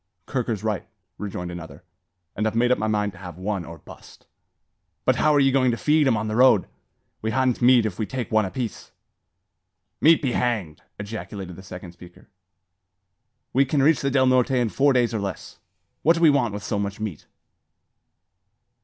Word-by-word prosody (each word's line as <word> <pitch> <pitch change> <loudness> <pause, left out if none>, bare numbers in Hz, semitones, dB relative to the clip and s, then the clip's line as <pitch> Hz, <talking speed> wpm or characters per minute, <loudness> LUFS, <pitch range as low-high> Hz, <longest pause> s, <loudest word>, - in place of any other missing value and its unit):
"Kirker's 115 -6 -3
right," 110 -3 -2 0.3
Rejoined 90 -4 -5
another; 80 -4 -9 0.5
"and 110 - 0
I've 110 - -3
made 120 +2 +2
up 125 - +2
my 110 - -1
mind 105 -1 0
to 100 - -15
have 90 -3 -9
one, 95 0 -3
or 85 0 -10
bust." - - -15 0.8
"But - - +3
how 155 - +3
are - - +5
ye 135 -1 +4
goin' 130 -1 +3
to 115 - -1
feed 150 +1 +2
'em 115 -4 +3
on 110 0 -3
the 110 - -2
road? 125 -5 +5 0.6
We 110 - -2
ha'n't 130 +1 0
meat 120 -2 +5
if 105 -2 -4
we 110 - -1
take 130 -3 -5
one 110 -1 +3
apiece." 115 +4 -5 1.1
"Meat 160 +1 +6
be 135 -5 -1
hanged!" 110 -12 -2 0.2
ejaculated 100 -3 -7
the 95 - -11
second 90 -2 -9
speaker; 90 0 -16 1.2
"we 135 - +4
kin 140 +1 0
reach 155 +1 +4
the 140 - 0
Del 130 -1 +3
Norte 130 -1 +3
in 120 -3 +1
four 140 +5 +3
days 120 -3 +2
or 110 - -1
less. 100 -4 -6 0.4
What 165 +2 +4
do 165 - -3
we 155 - +7
want 120 -7 0
with 105 - -6
so 100 +1 -2
much 100 +1 -4
meat?" 105 -8 -6
110 Hz, 190 wpm, -24 LUFS, 100-130 Hz, 1.2 s, we